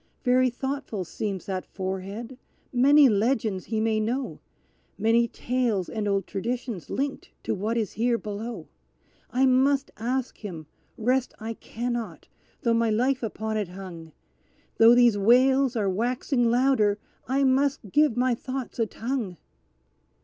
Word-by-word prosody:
Very 255 0 +4
thoughtful 255 -6 -4
seems 195 +1 -4
that 185 -2 -3
forehead; 195 +6 -6 0.3
many 280 +3 +6
legends 215 -3 +1
he 220 -1 -2
may 220 0 +1
know; 245 +5 -2 0.6
Many 230 +1 +3
tales 235 -6 -1
and 215 -2 -3
old 195 -2 +1
traditions 230 -2 -4
linked 275 +1 -3
to - - -1
what 215 +4 -2
is 220 -3 -1
here 235 +2 +1
below! 220 +2 -6 0.6
I 260 +2 +2
must 270 +2 +3
ask 250 +3 -2
him 170 -7 -7 0.3
rest 255 +3 0
I 225 +1 -4
cannot 240 +1 -5 0.4
though 235 -2 +3
my 230 0 +2
life 250 +5 +1
upon 220 -1 -3
it 210 -3 -1
hung 175 -3 -9 0.7
Though 230 +1 +8
these 240 -4 +5
wails 255 +4 +4
are 210 -3 0
waxing 240 +4 0
louder, 240 -4 +3 0.3
I 270 +3 +1
must 270 -5 +1
give 295 -6 +3
my 250 0 +3
thoughts 255 +1 -5
a 225 - +2
tongue. 225 -6 -4
235 Hz, 140 wpm, -26 LUFS, 210-255 Hz, 0.7 s, Though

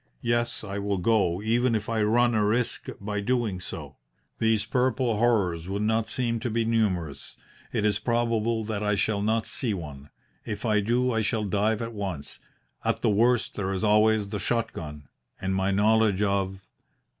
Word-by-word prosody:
Yes, 120 -1 0
I 100 -1 -4
will 100 -1 -1
go, 95 -2 +1
even 115 +2 +2
if 110 -1 -2
I 115 -1 0
run 120 +3 +3
a 110 -1 +2
risk 115 +3 0
by 105 +1 -3
doing 115 -4 0
so. - - -7 0.4
These 110 -2 +2
purple 125 -1 +1
horrors 95 -8 +1
would 100 +2 -1
not 110 0 +1
seem 115 -1 -1
to 120 - -3
be 115 0 0
numerous. 95 -10 -1 0.3
It 105 - 0
is 105 -1 +2
probable 115 -1 0
that 105 -1 -3
I 105 -1 +1
shall 100 +1 0
not 110 +2 +1
see 115 -6 -1
one. 75 -5 -8 0.3
If 105 +1 -5
I 105 -2 +3
do 120 +5 +1
I 110 -1 +1
shall 110 +1 0
dive 105 +3 +1
at 115 0 -5
once. 95 -9 -5 0.4
At - - -1
the - - +4
worst 120 +3 +2
there 95 -2 -2
is 95 +2 -2
always 105 -1 +3
the 105 0 -3
shot 115 +3 -1
gun 75 -3 -8 0.3
and 95 0 -1
my 95 0 +1
knowledge 105 0 +3
of 95 -1 -1
105 Hz, 180 wpm, -26 LUFS, 100-115 Hz, 0.4 s, the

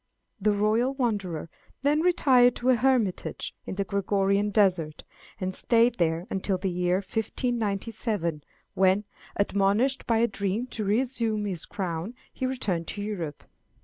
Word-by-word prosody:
The 210 +2 +3
royal 220 +6 +1
wanderer 200 - -2 0.4
then 295 +2 +3
retired 260 -8 +4
to 250 - -1
a - - +5
hermitage 240 -6 0
in - - -4
the 200 - 0
Georgian 200 +1 +1
desert, 180 -7 +1 0.4
and 185 0 -2
stayed 235 +1 +3
there 165 0 +1
until 190 0 0
the 190 0 -2
year 180 0 +1
1597, 205 - -2 0.3
when, 190 +2 +3 0.3
admonished 200 +6 +1
by 230 - +3
a 235 +1 +3
dream 200 +3 -2
to 220 - -2
resume 220 0 0
his 185 -5 -3
crown, 180 +3 -4 0.2
he 260 - -2
returned 195 -11 -2
to 205 - -5
Europe. 175 -8 -5
205 Hz, 140 wpm, -27 LUFS, 185-235 Hz, 0.4 s, a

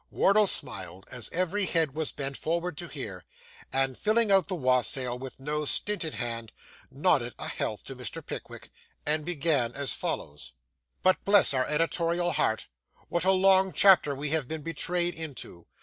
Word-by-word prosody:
Wardle 205 +1 +3
smiled, 95 - -1
as 120 - -1
every 185 +3 -1
head 160 -5 +1
was 155 0 -2
bent 140 -1 -4
forward 170 +2 -2
to 175 - -7
hear, 100 - -7 0.5
and 135 -1 +1
filling 215 - +2
out 195 -3 +4
the 190 - -3
wassail 125 -3 +2
with 130 0 -8
no 150 +2 -2
stinted 165 - -1
hand, 115 -1 -4 0.4
nodded - - 0
a - - -4
health - - -3
to - - -8
Mr. - - -6
Pickwick, - - -9 0.3
and 150 0 0
began 150 -7 0
as 140 -1 0
follows 75 -4 -5 0.5
But 185 - +2
bless 200 -6 +6
our 130 -1 0
editorial 170 +2 0
heart, 110 -7 0 0.4
what 170 +1 -1
a 190 - +5
long 190 0 +4
chapter 185 -8 +5
we 145 +1 -2
have 155 -5 +2
been 160 +1 -5
betrayed 175 +2 -1
into! 140 - -8
155 Hz, 165 wpm, -27 LUFS, 130-180 Hz, 0.5 s, bless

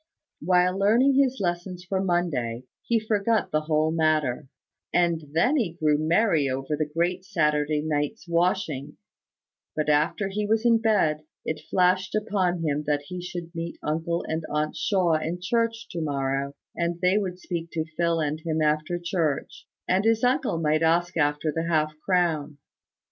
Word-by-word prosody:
While 180 +2 +2
learning 235 +7 +4
his 265 -1 0
lessons 180 0 -3
for 190 +1 -1
Monday, 140 -10 -1 0.2
he 230 -1 +1
forgot 220 0 0
the 155 - +1
whole 155 0 +1
matter; 155 -4 +1 0.4
and 170 -2 +2
then 245 - +3
he 205 - 0
grew 155 -3 +1
merry 160 -2 +2
over 135 +3 -2
the 150 0 -2
great 175 +3 0
Saturday 150 -5 +1
night's 155 +6 -2
washing; 170 -5 0 0.8
but 155 -1 -1
after 150 +7 +2
he 205 +1 -2
was 220 +2 +1
in 230 -1 +5
bed, 200 -9 +2 0.2
it 155 - -3
flashed 185 +1 +2
upon 190 -5 0
him 150 -1 0
that 145 -1 +1
he 180 -1 -5
should 175 -1 -7
meet 170 0 -5
uncle 165 +2 -1
and 160 0 -2
aunt 150 0 -1
Shaw 180 -6 +2
in 165 +3 -3
church 230 +5 -1
to 170 - -4
morrow, 140 -1 -2 0.2
and 170 0 -1
they 185 +4 +3
would 185 -3 -3
speak 170 -2 -5
to 160 -1 -1
Phil 170 -1 +1
and 155 0 -1
him 160 -1 -2
after 155 +2 +1
church; 170 -4 -2 0.2
and 185 +2 +2
his 225 +1 +2
uncle 250 - +2
might 155 -1 +1
ask 170 +2 +2
after 150 0 +1
the 165 +2 -2
half 155 -2 +1
crown. 160 -6 0
170 Hz, 165 wpm, -26 LUFS, 155-190 Hz, 0.8 s, in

